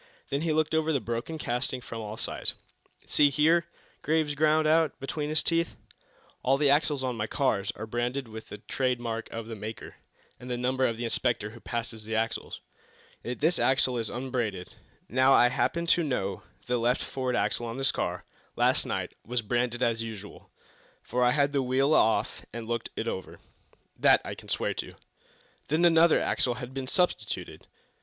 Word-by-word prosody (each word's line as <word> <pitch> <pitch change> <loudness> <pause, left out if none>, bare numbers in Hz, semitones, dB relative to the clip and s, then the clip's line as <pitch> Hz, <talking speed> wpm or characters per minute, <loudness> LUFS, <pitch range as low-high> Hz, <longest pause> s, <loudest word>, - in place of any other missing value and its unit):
Then 140 +1 0
he 165 0 0
looked 155 0 +1
over 160 0 +2
the 140 - +2
broken 120 +7 -4
casting 125 -2 -2
from 115 -2 -7
all 105 0 -6
sides. - - -2 0.5
"See 145 - +5
here," 160 +4 +3 0.3
Graves 155 -1 +1
ground 155 +1 +3
out, 160 0 +3
between 145 +2 -3
his 155 0 +2
teeth, 165 0 +1 0.7
"all 135 +2 +3
the 145 -1 +4
axles 145 -1 +2
on 125 -2 -1
my 105 -1 -2
cars 110 -8 0
are 110 - -5
branded 120 +3 -2
with 110 0 -9
the 105 - -7
trade 125 +3 -1
mark 115 -1 -3
of 115 -1 -5
the 115 0 -6
maker, 110 +1 -7 0.4
and 125 - -9
the 125 - -1
number 130 +1 +1
of 115 - -2
the 120 - -4
inspector 115 -2 0
who 115 - -12
passes 115 -2 -4
the 110 +1 -3
axles. 115 +1 -2 0.6
Yet 125 +3 -5
this 165 +4 +2
axle 130 -1 +3
is 115 - -2
unbranded! 120 -7 -3 0.3
Now, 130 +2 +4
I 120 - +6
happen 170 +6 0
to 170 +1 +4
know 100 - -2 0.2
that - - -30
the 125 0 +1
left 120 +2 +1
forward 130 -2 -2
axle 120 0 0
on 115 +2 -5
this 135 0 +3
car - - -3 0.3
last - - +2
night - - -3
was 120 0 -2
branded 120 +2 0
as 115 -1 +1
usual, 105 -3 -8 0.5
for 125 0 0
I 125 - +5
had 140 +2 +2
the 140 - +2
wheel 135 +3 +2
off 110 -5 +2
and 115 -1 -6
looked 115 0 -2
it 115 - -3
over. 95 -4 -5 0.6
That - - +6
I - - -4
can - - -12
swear - - 0
to." - - -6 0.7
"Then 160 +4 +3
another 165 -1 +6
axle 125 -2 0
has 125 0 -6
been 130 0 -5
substituted?" 135 - -1
125 Hz, 190 wpm, -28 LUFS, 115-145 Hz, 0.7 s, I